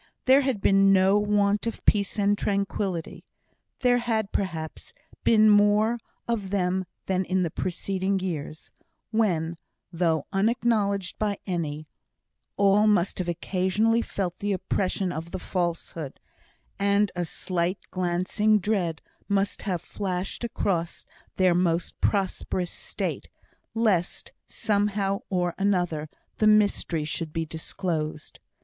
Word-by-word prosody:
There 265 +2 +6
had 260 -7 -1
been 195 0 +5
no 195 +1 +5
want 205 +1 +2
of 230 - -5
peace 200 -1 +2
and 205 0 +3
tranquillity; 200 -4 -2 0.6
there 245 -1 +4
had, 220 -4 -1
perhaps, 165 -5 -4 0.3
been 215 -1 +5
more 210 +2 +4 0.3
of 220 -5 -1
them 185 -1 0 0.2
than 190 -1 +1
in 185 0 0
the 165 - -2
preceding 190 +2 -1
years, 160 -4 -5 0.4
when, 170 -7 +1 0.4
though 165 -3 +1
unacknowledged 205 -2 +1
by 205 -2 0
any, 155 -5 -3 0.7
all 200 +1 +4
must 200 -4 +2
have 180 - -2
occasionally 190 +6 +1
felt 185 -6 -3
the 205 0 0
oppression 190 0 -1
of 165 0 -5
the 185 - -4
falsehood 170 -5 -3 0.6
and 200 0 +2
a 175 - -1
slight 180 +2 -2
glancing 185 +4 +1
dread 180 -6 -1 0.3
must 200 -1 0
have 175 -2 -1
flashed 190 +2 -4
across 185 -7 -2 0.3
their 185 -2 +4
most 175 -1 0
prosperous 185 -3 0
state, - - -4 0.5
lest, 210 -7 0 0.2
somehow 200 -2 0
or 180 -2 0
another, 175 -6 0 0.3
the 215 - +3
mystery 205 -6 +3
should 155 +1 -3
be 165 0 -2
disclosed. 160 -1 -4
190 Hz, 120 wpm, -26 LUFS, 175-205 Hz, 0.7 s, There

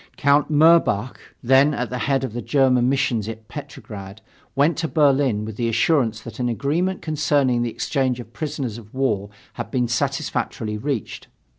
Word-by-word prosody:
Count 145 +1 +3
Mirbach, 150 -7 +3 0.2
then 135 +4 +4
at 125 -1 -3
the 125 - -3
head 135 0 0
of 130 -5 -4
the 120 - -4
German 130 -3 +3
missions 120 -5 0
at 110 -1 -9
Petrograd, 105 -8 -9 0.4
went 145 +5 +3
to 165 - -1
Berlin 135 -8 +2
with 110 -1 -7
the 115 -1 0
assurance 115 - +1
that 115 - -10
an 125 -1 0
agreement 165 +10 -1
concerning 145 -5 +1
the 120 - 0
exchange 130 +1 -1
of 120 -1 -10
prisoners 135 -7 -4
of 110 +1 -16
war 105 -7 0 0.2
had 120 - -6
been 125 -3 0
satisfactorily 115 -2 -2
reached. 130 0 -4
130 Hz, 165 wpm, -22 LUFS, 115-145 Hz, 0.4 s, then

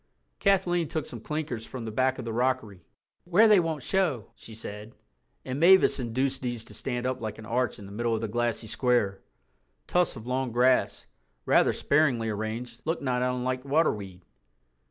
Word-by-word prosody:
Kathleen 180 -4 +2
took 155 0 -3
some 120 - -8
clinkers 150 -5 -4
from 120 0 -7
the 110 - -4
back 130 +3 +1
of 125 - -6
the 115 - -4
rockery—"where 125 - 0
they 210 -3 +6
won't 160 -5 -2
show," 160 - 0
she 110 - -12
said—and 110 +5 -9
Mavis 185 -2 +6
induced 130 +3 -1
these 120 -3 -3
to - - -13
stand 125 -2 -3
up 130 0 -2
like 110 -1 -4
an 110 - -10
arch 125 +3 -1
in 100 - -10
the 100 - -11
middle 115 +2 -1
of 110 - -3
the 115 - -2
glassy 120 +1 -1
square. 115 -3 0 0.6
Tufts 180 -4 +1
of 110 -2 -9
long 130 0 -1
grass, 125 +1 +2 0.4
rather - - +4
sparingly 135 -7 +1
arranged, 110 +3 -5
looked 165 -1 -2
not 125 -2 0
unlike 125 0 -1
waterweed. 105 - 0
125 Hz, 170 wpm, -27 LUFS, 115-140 Hz, 0.6 s, they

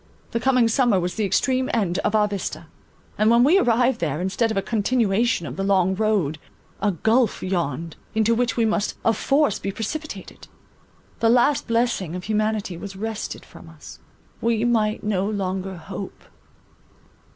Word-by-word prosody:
The 230 - -1
coming 250 -1 +3
summer 230 -4 +3
was 180 0 -2
the 215 - -1
extreme 260 +6 +1
end 190 -5 0
of 215 - 0
our 210 -1 +4
vista; 200 -3 -5 0.5
and, 215 +1 +4
when 235 +1 +5
we 335 +9 +5
arrived 245 - +2
there, 150 -2 -1
instead 190 +5 0
of 220 - -2
a - - +2
continuation 225 -2 +1
of 130 -1 -7
the 195 - -1
long 190 -1 +2
road, 190 -7 0 0.4
a 205 0 +2
gulph 220 +6 +1
yawned, 170 -4 -2 0.2
into 220 +1 +3
which 245 +1 0
we 230 - +3
must 215 -1 0
of 225 - +3
force 280 -6 +1
be 195 - -3
precipitated. 300 +10 -6 0.7
The 225 - +3
last 250 +4 +3
blessing 230 -7 0
of 180 - -6
humanity 215 -3 -1
was 195 +2 -8
wrested 220 +2 -5
from - - -14
us; - - -13 0.4
we 230 0 +1
might 220 -2 +1
no 200 -1 0
longer 190 -2 -3
hope. 190 +3 -8
215 Hz, 165 wpm, -23 LUFS, 190-235 Hz, 0.7 s, when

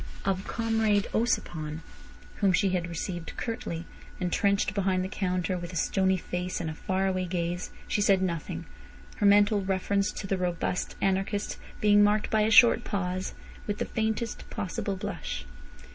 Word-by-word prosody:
Of 195 -1 -1
Comrade 225 -3 +1
Ossipon, 160 -9 -1 0.6
whom 195 -3 +3
she 195 +3 +3
had 175 -2 -1
received 170 0 -4
curtly, 175 -8 -4 0.3
entrenched 200 +3 +1
behind 190 -2 +1
the - - -2
counter 185 -2 -1
with 175 0 -6
a - - -6
stony 190 +3 +2
face 180 +1 -3
and 165 -2 -2
a - - -5
faraway 185 +2 0
gaze, 175 0 -2 0.2
she 205 - 0
said 200 -2 +4
nothing, 170 -4 -3 0.5
her 205 - +3
mental 205 0 +5
reference 195 +1 0
to - - -5
the 195 -1 -1
robust 180 0 -1
anarchist 195 +2 0 0.2
being 205 -1 +6
marked 210 +1 +2
by 220 - +3
a 215 - +3
short 235 +1 +7
pause, 185 -2 -2 0.3
with 205 -1 -1
the - - -1
faintest 220 +1 -2
possible 200 -1 -3
blush. 185 - -5
190 Hz, 155 wpm, -28 LUFS, 180-205 Hz, 0.6 s, short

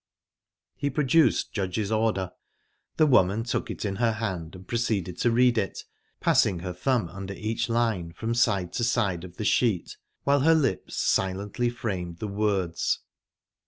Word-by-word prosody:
He 145 - -1
produced 140 0 +2
Judge's 100 +1 -2
order. 110 -4 0 0.7
The 155 - +5
woman 110 -5 +4
took 115 - -2
it - - -4
in 95 -2 -2
her 115 -1 +2
hand 95 -7 -4
and 95 0 -12
proceeded 105 -7 -1
to 120 - +3
read 120 0 +4
it, 100 - -3 0.4
passing 90 -3 +3
her 90 0 -4
thumb 110 +3 0
under 100 +2 -7
each 115 +3 -2
line 115 -8 0
from 110 +7 -3
side 100 -7 +1
to 120 - -1
side 100 -8 +1
of 90 -1 -11
the 110 - -3
sheet, 110 -5 +1 0.3
while 140 +1 +3
her 160 +4 +5
lips 135 - 0
silently 100 +6 0
framed 95 -8 -4
the 110 - -4
words. 100 -4 0
110 Hz, 160 wpm, -26 LUFS, 95-120 Hz, 0.7 s, The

